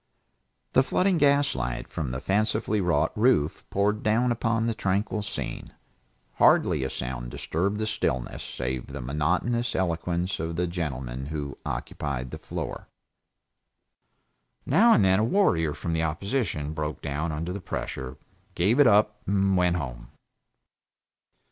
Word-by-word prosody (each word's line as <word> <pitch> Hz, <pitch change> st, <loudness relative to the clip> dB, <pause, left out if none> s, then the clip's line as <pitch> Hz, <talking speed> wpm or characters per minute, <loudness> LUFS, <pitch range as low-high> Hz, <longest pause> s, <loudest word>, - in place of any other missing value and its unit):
The 130 Hz, -, +6 dB
flooding 180 Hz, +7 st, +2 dB
gaslight 135 Hz, -, +2 dB
from 75 Hz, -5 st, -4 dB
the 65 Hz, +1 st, -3 dB
fancifully 105 Hz, +4 st, 0 dB
wrought 90 Hz, -2 st, +2 dB
roof 105 Hz, -, +2 dB
poured 105 Hz, +2 st, +1 dB
down 115 Hz, +3 st, +2 dB
upon 115 Hz, -1 st, 0 dB
the 115 Hz, -, +1 dB
tranquil 100 Hz, +1 st, -1 dB
scene. 100 Hz, -, -4 dB, 0.7 s
Hardly -, -, +4 dB
a 65 Hz, -, -1 dB
sound -, -, -5 dB
disturbed 95 Hz, +11 st, -2 dB
the 110 Hz, -, -1 dB
stillness, 85 Hz, -, -2 dB
save 60 Hz, 0 st, -4 dB
the 70 Hz, +1 st, -7 dB
monotonous 90 Hz, -, 0 dB
eloquence 90 Hz, 0 st, -1 dB
of 80 Hz, +1 st, -3 dB
the 90 Hz, +1 st, 0 dB
gentleman 70 Hz, -7 st, -4 dB
who 75 Hz, -2 st, -4 dB
occupied 65 Hz, -4 st, -4 dB
the -, -, -7 dB
floor. -, -, -5 dB, 1.8 s
Now 230 Hz, +4 st, +5 dB
and 100 Hz, -, +4 dB
then 95 Hz, +1 st, +4 dB
a -, -, +2 dB
warrior 110 Hz, -, +3 dB
of -, -, -13 dB
the 80 Hz, -, +1 dB
opposition 80 Hz, -, -1 dB
broke 75 Hz, -1 st, -4 dB
down 75 Hz, +3 st, -2 dB
under 85 Hz, +4 st, -3 dB
the 100 Hz, -, -5 dB
pressure, 65 Hz, -7 st, -5 dB, 0.4 s
gave 105 Hz, +10 st, +2 dB
it 145 Hz, -, +8 dB
up, 105 Hz, 0 st, +3 dB
and 100 Hz, 0 st, +2 dB
went 90 Hz, -1 st, +3 dB
home. -, -, -5 dB
90 Hz, 140 wpm, -26 LUFS, 70-105 Hz, 1.8 s, it